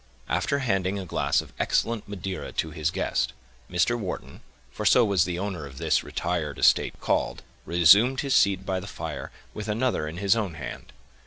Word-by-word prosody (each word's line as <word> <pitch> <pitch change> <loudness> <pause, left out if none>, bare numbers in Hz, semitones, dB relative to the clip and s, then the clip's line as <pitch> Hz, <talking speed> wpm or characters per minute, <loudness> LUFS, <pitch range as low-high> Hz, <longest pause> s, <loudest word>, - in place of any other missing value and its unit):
After 140 - 0
handing 95 -3 0
a 95 - -5
glass 85 - +1
of - - -15
excellent 115 -2 0
Madeira 95 -2 -5
to 80 - -2
his 75 0 -1
guest, - - -1 0.4
Mr. 90 +7 +2
Wharton, 90 - -6 0.3
for - - -6
so 125 - +5
was 95 -4 +3
the 90 -1 -3
owner 90 -6 -4
of 65 -1 -13
this - - +1
retired 85 -4 -3
estate - - +3
called, - - -1 0.2
resumed 100 +10 +5
his 140 -2 -1
seat 95 -1 +3
by 95 -1 -1
the 95 - -8
fire, 80 -5 -6 0.2
with 105 0 -6
another 110 -6 0
in 80 +3 -6
his 100 +3 +3
own 100 -7 -2
hand. 75 - -8
95 Hz, 180 wpm, -26 LUFS, 85-105 Hz, 0.4 s, so